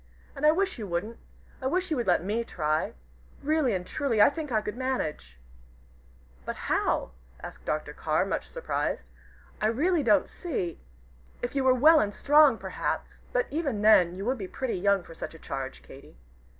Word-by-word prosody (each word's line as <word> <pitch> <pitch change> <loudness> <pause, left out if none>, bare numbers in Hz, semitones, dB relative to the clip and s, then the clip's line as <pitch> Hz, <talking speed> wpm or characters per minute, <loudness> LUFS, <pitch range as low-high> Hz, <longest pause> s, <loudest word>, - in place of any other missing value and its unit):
And 295 +2 +2
I - - +8
wish 380 -2 -1
you 210 - -5
wouldn't. 190 +6 -3 0.4
I 260 - -1
wish 365 +5 -1
you 310 - +1
would 240 - -2
let 175 -2 +3
me 215 +5 -1
try. 155 -7 -1 0.5
Really 295 -6 +2
and 180 -1 -3
truly, 235 +1 -1
I 205 - +7
think 300 -1 -6
I 220 - +3
could 210 0 -5
manage." 155 - -3 1.1
"But - - -4
how?" - - 0 0.3
asked - - -9
Dr. - - -2
Carr, - - 0
much - - -3
surprised. - - -3 0.5
"I 215 - +3
really 310 +9 +2
don't 210 -7 +3
see. 215 - -4 0.6
If 245 - -2
you 275 - +1
were 260 -1 +5
well 310 +5 +7
and 205 -5 -1
strong, 295 -4 +5
perhaps - - -4
but - - +1
even 280 -9 -2
then 180 -5 +6
you 195 +2 -5
would 255 +1 0
be 190 - -4
pretty 250 -2 -3
young 200 0 +2
for 165 - -12
such 165 - -7
a - - -10
charge, 135 -3 -6
Katy." 135 - -14
230 Hz, 185 wpm, -28 LUFS, 185-285 Hz, 1.1 s, I